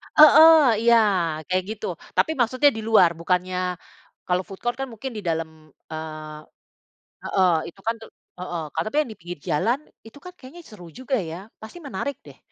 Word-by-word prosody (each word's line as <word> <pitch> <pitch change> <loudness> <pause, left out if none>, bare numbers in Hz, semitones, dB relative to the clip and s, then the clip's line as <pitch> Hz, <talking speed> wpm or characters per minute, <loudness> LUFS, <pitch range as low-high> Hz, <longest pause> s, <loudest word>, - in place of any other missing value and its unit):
Heeh, 305 -5 +8
iya, 235 0 +5 0.5
kayak 185 0 0
gitu. 215 - -6 0.3
Tapi 320 - +3
maksudnya 255 +4 +3
di - - -4
luar, 215 -6 +6
bukannya, 180 +1 -1 0.7
kalau 180 +1 0
food 195 - -10
court 240 +1 -1
kan 270 - -3
mungkin 260 +4 -6
di 210 - -5
dalam, 160 0 -2 0.4
eee 155 -1 -7 0.9
heeh, 185 -2 +2 0.2
itu 195 - -19
kan 230 - +1
te - - -10 0.3
heeh, 175 -2 -4
ka - - -1
tapi 215 - -5
yang 295 - -5
di - - -25
pinggir 175 -1 -8
jalan, 230 - +1 0.3
itu 225 - -15
kan 360 - -9
kayaknya 280 +7 -13
seru 205 -5 -12
juga 260 +1 -1 0.2
ya, 165 - -6 0.2
pasti 220 +10 -11
menarik 280 0 -4
deh. - - -14
215 Hz, 175 wpm, -23 LUFS, 180-260 Hz, 0.9 s, Heeh